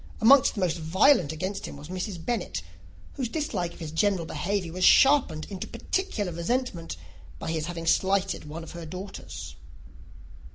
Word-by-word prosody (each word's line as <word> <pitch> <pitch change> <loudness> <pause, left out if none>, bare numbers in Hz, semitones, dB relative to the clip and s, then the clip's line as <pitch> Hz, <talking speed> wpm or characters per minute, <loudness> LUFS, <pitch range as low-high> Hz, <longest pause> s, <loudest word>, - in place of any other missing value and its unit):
Amongst 260 +4 +6
the 205 - -3
most 175 -2 +1
violent 165 - +4
against 190 +6 -4
him - - -8
was 145 +3 -11
Mrs. 185 -2 -5
Bennet, 175 - -2 0.5
whose 255 -4 -3
dislike 215 - -2
of - - -15
his 160 -3 -6
general 180 +1 +1
behaviour 175 +3 -2
was 185 +1 -2
sharpened 270 - +5
into 190 - -5
particular 210 - -2
resentment 170 - -2 0.4
by 160 - -4
his 160 -1 -2
having 170 -1 -5
slighted 190 +2 +1
one 165 +2 -6
of - - -9
her 170 -2 -8
daughters. 185 +4 -7
180 Hz, 160 wpm, -27 LUFS, 165-205 Hz, 0.5 s, Amongst